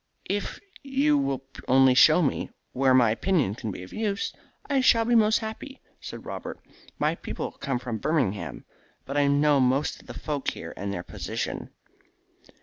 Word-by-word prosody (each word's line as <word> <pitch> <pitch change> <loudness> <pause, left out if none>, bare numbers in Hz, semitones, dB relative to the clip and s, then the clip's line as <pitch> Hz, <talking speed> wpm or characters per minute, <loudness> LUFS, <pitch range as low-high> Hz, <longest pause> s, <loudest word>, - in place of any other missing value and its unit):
"If 205 0 -3 0.2
you 280 +2 +2
will 135 - 0 0.2
only 130 0 +6
show 155 +6 +6
me 140 - -1 0.2
where 130 0 +3
my 120 -4 +5
opinion 145 - +1
can 110 0 -5
be 90 -2 -6
of 90 - -12
any - - -5
use 200 -2 -1 0.3
I 275 -2 +2
shall 230 -3 +5
be 240 - +1
most 220 -1 +5
happy," 225 +5 -7 0.2
said - - -8
Robert. - - -6 0.4
"My - - +1
people - - -5
come 135 -3 -3
from 120 -3 -4
Birmingham, 125 - -1 0.4
but 140 - -5
I 145 -1 +3
know 145 0 +4
most 130 +3 +1
of - - -21
the - - -8
folk 145 -3 -2
here - - -7
and 100 +1 -4
their 90 -3 -4
position." - - -4
140 Hz, 175 wpm, -26 LUFS, -, 0.4 s, only